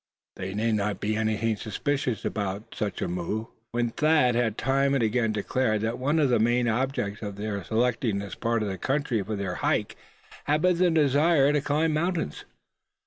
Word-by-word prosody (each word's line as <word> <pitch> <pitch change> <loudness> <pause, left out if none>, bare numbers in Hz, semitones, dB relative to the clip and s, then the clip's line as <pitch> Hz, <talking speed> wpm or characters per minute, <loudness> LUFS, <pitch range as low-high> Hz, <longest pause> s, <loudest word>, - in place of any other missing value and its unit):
There 95 +1 -5
need 115 +2 +1
not 105 -1 -1
be 105 +1 -1
anything 110 0 0
suspicious 135 +3 -2
about 100 0 -3
such 105 -2 -3
a - - -1
move, 90 +5 -3 0.3
when 120 -1 0
Thad 150 -3 +3
had 115 -2 0
time 135 +1 +2
and 130 - +1
again 115 0 +1
declared 110 +1 0
that 110 +2 -2
one 145 +5 +1
of 145 -4 +3
the 120 -2 +3
main 120 +2 +2
objects 115 -3 -1
of 100 -2 -5
their 100 -1 -4
selecting 115 +1 0
this 100 -2 -5
part 115 -1 -1
of - - -2
the 95 -2 -5
country 135 -3 0
for 105 +3 -4
their 100 -2 -3
hike, - - 0 0.5
had 150 +1 +1
been 180 -1 +3
the 180 -1 +4
desire 150 -1 +4
to 145 - +2
climb 150 +3 +1
mountains. 165 - -2
115 Hz, 190 wpm, -26 LUFS, 105-140 Hz, 0.5 s, the